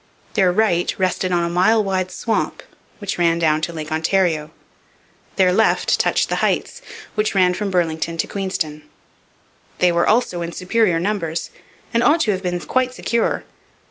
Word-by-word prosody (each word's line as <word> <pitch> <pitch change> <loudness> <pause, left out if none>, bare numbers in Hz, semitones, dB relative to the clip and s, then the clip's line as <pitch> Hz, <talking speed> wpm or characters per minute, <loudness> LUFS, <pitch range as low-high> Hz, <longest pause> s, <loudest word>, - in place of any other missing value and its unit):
Their 190 -4 +3
right 175 -3 +1
rested 185 0 0
on 175 -1 +2
a - - 0
mile 200 +5 +3
wide 190 -2 -1
swamp, 225 +4 -2 0.3
which 200 -3 -4
ran 170 -1 +3
down 155 -2 +2
to 170 - -2
Lake 155 -2 -7
Ontario. 160 -1 +1 0.9
Their 185 -2 +3
left 220 +4 +2
touched - - +2
the - - -1
Heights, 485 - -1 0.3
which 210 -1 -1
ran 180 -2 +4
from 200 +3 -3
Burlington 165 -2 -1
to - - 0
Queenston. 180 -6 -3 1.0
They 180 -1 +3
were 170 0 +1
also 215 -6 +1
in 170 0 -4
superior 185 -2 +1
numbers, 170 -4 -2 0.4
and 235 - +3
ought 315 +6 +4
to 215 - +2
have 190 -2 -2
been 180 -2 -2
quite 255 +3 0
secure. 235 -1 -1
180 Hz, 165 wpm, -20 LUFS, 170-210 Hz, 1.0 s, ran